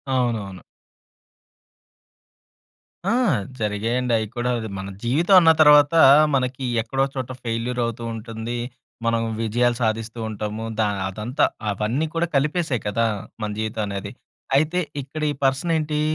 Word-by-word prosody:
అవునవును. 110 Hz, -7 st, -1 dB, 2.5 s
ఆ! -, -, +2 dB, 0.5 s
జరిగాయండి. 115 Hz, +4 st, -1 dB
అయి 110 Hz, -1 st, -2 dB
కూడా. 120 Hz, 0 st, -1 dB
అది 110 Hz, -2 st, -5 dB
మన 95 Hz, 0 st, -5 dB, 0.2 s
జీవితం 160 Hz, +11 st, +3 dB
అన్న 165 Hz, -2 st, +6 dB
తరవాత, 150 Hz, 0 st, +7 dB, 0.4 s
మనకి 130 Hz, 0 st, -1 dB, 0.2 s
ఎక్కడో 135 Hz, +4 st, -2 dB
ఒకచోట 130 Hz, -2 st, -5 dB
ఫెయిల్యూర్ 120 Hz, +1 st, -2 dB
అవుతూ 115 Hz, 0 st, -3 dB
ఉంటుంది. 115 Hz, +1 st, -5 dB, 0.5 s
మనం 115 Hz, 0 st, +2 dB, 0.2 s
విజయాలు 120 Hz, +2 st, +1 dB
సాధిస్తూ 115 Hz, +1 st, -2 dB
ఉంటాము. 105 Hz, +1 st, -4 dB
ద -, -, +2 dB, 0.3 s
అదంతా 110 Hz, +9 st, -2 dB, 0.3 s
అవన్నీ 110 Hz, +9 st, -1 dB
కూడా 170 Hz, +1 st, +1 dB
కలిపేసే 150 Hz, 0 st, +1 dB
కదా! 110 Hz, +3 st, +1 dB, 0.4 s
మన 105 Hz, -, -2 dB
జీవితం 110 Hz, 0 st, -2 dB
అనేది. 100 Hz, 0 st, -5 dB, 0.4 s
అయితే, 155 Hz, +5 st, +2 dB, 0.2 s
ఇక్కడీ 150 Hz, +3 st, -3 dB
పర్సనేంటీ, 150 Hz, +2 st, +1 dB
120 Hz, 120 wpm, -23 LUFS, 110-140 Hz, 2.5 s, తరవాత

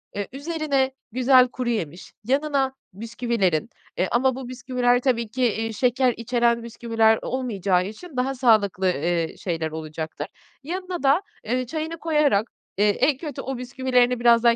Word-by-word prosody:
eee, 205 Hz, 0 st, -3 dB
üzerine 280 Hz, -2 st, -1 dB, 0.2 s
güzel 255 Hz, +1 st, +5 dB
kuruyemiş, 225 Hz, -, -4 dB
yanına 275 Hz, +1 st, +1 dB, 0.2 s
bisküvilerin, 225 Hz, -5 st, -1 dB, 0.3 s
eee, 185 Hz, -, +1 dB
ama 260 Hz, +2 st, +2 dB
bu 260 Hz, -1 st, -7 dB
bisküviler 245 Hz, 0 st, +1 dB
tabii 235 Hz, -4 st, 0 dB
ki, 255 Hz, +3 st, -2 dB
eee, 225 Hz, -1 st, 0 dB
şeker 250 Hz, +2 st, +2 dB
içeren 235 Hz, 0 st, +1 dB
bisküviler 225 Hz, -1 st, +2 dB
olmayacağı 200 Hz, -8 st, 0 dB
için 255 Hz, -, -9 dB
daha 265 Hz, +2 st, 0 dB
sağlıklı, 215 Hz, -7 st, +3 dB
eee, 170 Hz, 0 st, -1 dB
şeyler 165 Hz, -3 st, -3 dB
olacaktır. 155 Hz, -1 st, -5 dB, 0.4 s
Yanına 360 Hz, +2 st, -4 dB
da, 280 Hz, +6 st, +4 dB, 0.2 s
eee, 250 Hz, +3 st, -1 dB
çayını 315 Hz, +5 st, -4 dB
koyarak, 300 Hz, -10 st, +2 dB, 0.3 s
eee, 210 Hz, +1 st, +4 dB
en 260 Hz, +7 st, +2 dB
kötü 295 Hz, -2 st, -6 dB
o 270 Hz, -1 st, -4 dB
bisküvilerini 250 Hz, -1 st, +1 dB
biraz 235 Hz, -1 st, +5 dB
daha 235 Hz, -1 st, +5 dB
245 Hz, 145 wpm, -24 LUFS, 215-265 Hz, 0.4 s, güzel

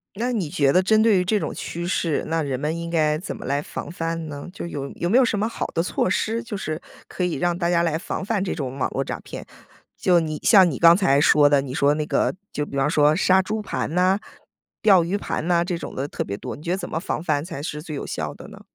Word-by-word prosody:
那 240 Hz, +4 st, -1 dB
你 185 Hz, -10 st, -1 dB
觉 140 Hz, -2 st, +2 dB
得 185 Hz, -, +5 dB
针 215 Hz, +3 st, +4 dB
对 220 Hz, -3 st, +4 dB
于 180 Hz, -, +1 dB
这 210 Hz, +3 st, +1 dB
种 -, -, -3 dB
趋 170 Hz, +1 st, -5 dB
势， 165 Hz, -4 st, 0 dB
那 165 Hz, 0 st, 0 dB
人 135 Hz, -4 st, -2 dB
们 155 Hz, +3 st, -2 dB
应 170 Hz, 0 st, -5 dB
该 155 Hz, -2 st, +2 dB
怎 175 Hz, -, -6 dB
么 -, -, -9 dB
来 140 Hz, +2 st, 0 dB
防 -, -, -7 dB
范 165 Hz, -1 st, -3 dB
呢？ 145 Hz, -2 st, -7 dB
就 180 Hz, -, -6 dB
有 140 Hz, -4 st, -5 dB
有 175 Hz, -, -2 dB
没 235 Hz, -, +4 dB
有 265 Hz, -, +6 dB
什 220 Hz, -4 st, 0 dB
么 215 Hz, -, +1 dB
好 -, -, -4 dB
的 165 Hz, -, -1 dB
措 180 Hz, +1 st, 0 dB
施， 225 Hz, +4 st, -1 dB
就 225 Hz, -3 st, -5 dB
是 155 Hz, -4 st, -4 dB, 0.3 s
可 180 Hz, -, -4 dB
以 180 Hz, -, 0 dB
让 175 Hz, -1 st, 0 dB
大 170 Hz, -1 st, 0 dB
家 170 Hz, -1 st, +3 dB
来 165 Hz, -2 st, 0 dB
防 185 Hz, -, -4 dB
范 205 Hz, -2 st, 0 dB
这 190 Hz, -, -2 dB
种 135 Hz, -2 st, -5 dB
网 130 Hz, -, 0 dB
络 135 Hz, -, -1 dB
诈 -, -, -5 dB
骗。 -, -, -9 dB, 0.5 s
就 180 Hz, -2 st, +4 dB
你 155 Hz, -2 st, -3 dB
像 190 Hz, -5 st, +7 dB
你 135 Hz, -, -4 dB
刚 170 Hz, +1 st, +7 dB
才 145 Hz, -8 st, +3 dB
说 145 Hz, -1 st, +6 dB
的， 145 Hz, -1 st, +4 dB
你 130 Hz, -2 st, -6 dB
说 140 Hz, +1 st, +3 dB
那 150 Hz, 0 st, -2 dB
个 160 Hz, -, 0 dB, 0.2 s
就 150 Hz, -, -2 dB
比 140 Hz, -, -9 dB
方 135 Hz, +1 st, +2 dB
说 150 Hz, 0 st, +4 dB
杀 190 Hz, +2 st, +4 dB
猪 215 Hz, +3 st, -3 dB
盘 190 Hz, -, -3 dB
呐、 185 Hz, +2 st, +3 dB, 0.6 s
钓 195 Hz, -5 st, +6 dB
鱼 190 Hz, +4 st, -1 dB
盘 175 Hz, -4 st, -3 dB
呐， 170 Hz, -1 st, +3 dB
这 175 Hz, -1 st, -2 dB
种 -, -, -8 dB
的 135 Hz, -, -2 dB
特 -, -, -3 dB
别 100 Hz, -, -4 dB
多， -, -, -7 dB
你 150 Hz, -, -13 dB
觉 170 Hz, -, -3 dB
得 185 Hz, -, +1 dB
怎 -, -, -6 dB
么 160 Hz, -, -2 dB
防 170 Hz, -3 st, -3 dB
范 150 Hz, -3 st, 0 dB
才 145 Hz, -5 st, -6 dB
是 150 Hz, -1 st, -4 dB
最 155 Hz, -1 st, -7 dB
有 -, -, -5 dB
效 -, -, -4 dB
的 -, -, -12 dB
呢？ -, -, -13 dB
170 Hz, 300 characters per minute, -23 LUFS, 150-185 Hz, 0.6 s, 像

